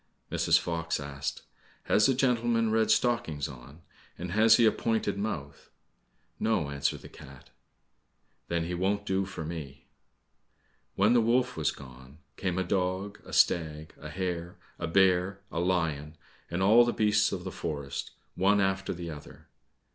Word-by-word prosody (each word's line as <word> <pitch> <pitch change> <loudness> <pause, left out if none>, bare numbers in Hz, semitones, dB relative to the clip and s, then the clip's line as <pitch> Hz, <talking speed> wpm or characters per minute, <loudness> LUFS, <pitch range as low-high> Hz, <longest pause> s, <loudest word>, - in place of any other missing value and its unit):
Mrs. - - +3
Fox 85 -2 -2
asked, 70 -1 -5 0.4
"Has 105 - +4
the 135 - +2
gentleman 120 -3 +2
red 110 -1 +2
stockings 110 - +1
on' 70 +5 -12 0.3
and 90 0 -5
has 110 +3 +6
he 120 - +5
a 110 - +6
pointed 110 -3 -1
mouth?" 90 -9 -5 0.7
"No," 90 -10 0
answered 70 0 -1
the - - -9
cat. 65 -1 -14 1.0
"Then 85 -1 -1
he 90 - -4
won't 100 +3 0
do 95 -1 0
for 80 -4 -6
me." 75 -5 -7 1.1
When 105 +4 +4
the 120 - +5
wolf 120 +3 +2
was - - +1
gone, 65 +1 -11 0.2
came 90 -1 -2
a 95 - +1
dog, 95 +2 -2
a - - -11
stag, 80 -2 +1
a 75 - -7
hare, 85 0 -4 0.2
a 85 - -2
bear, 95 +2 +3
a 85 - -2
lion, 80 -4 -1 0.3
and 85 +3 -1
all 110 +5 +7
the 120 - 0
beasts 105 -1 +3
of 90 -2 -4
the 95 - -5
forest, 70 -5 -4 0.2
one 100 +2 +3
after 95 -1 0
the 85 -1 -6
other. 75 -1 -12
90 Hz, 155 wpm, -29 LUFS, 80-105 Hz, 1.1 s, all